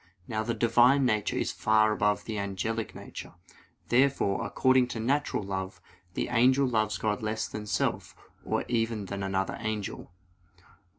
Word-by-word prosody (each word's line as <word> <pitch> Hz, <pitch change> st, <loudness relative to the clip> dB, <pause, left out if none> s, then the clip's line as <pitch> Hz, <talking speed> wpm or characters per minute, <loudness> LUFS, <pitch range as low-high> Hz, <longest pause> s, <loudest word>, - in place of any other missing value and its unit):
Now 110 Hz, -2 st, -1 dB
the 115 Hz, +1 st, -2 dB
Divine 120 Hz, +4 st, +4 dB
nature 110 Hz, -4 st, 0 dB
is -, -, 0 dB
far 110 Hz, 0 st, +3 dB
above 105 Hz, -1 st, +1 dB
the 110 Hz, -2 st, -3 dB
angelic 100 Hz, +3 st, -3 dB
nature. -, -, -9 dB, 0.5 s
Therefore, 125 Hz, -6 st, +2 dB
according 130 Hz, +4 st, +3 dB
to 120 Hz, -2 st, -5 dB
natural 135 Hz, -1 st, 0 dB
love, 95 Hz, -1 st, -4 dB, 0.4 s
the -, -, -2 dB
angel 130 Hz, +3 st, +4 dB
loves 110 Hz, -3 st, 0 dB
God 105 Hz, -1 st, -1 dB
less 110 Hz, 0 st, -2 dB
than 105 Hz, 0 st, -7 dB
self, -, -, -1 dB, 0.3 s
or -, -, -1 dB
even 115 Hz, -3 st, -1 dB
than 100 Hz, +1 st, -5 dB
another 95 Hz, 0 st, -1 dB
angel. 110 Hz, -5 st, -4 dB
110 Hz, 150 wpm, -28 LUFS, 105-120 Hz, 0.5 s, Divine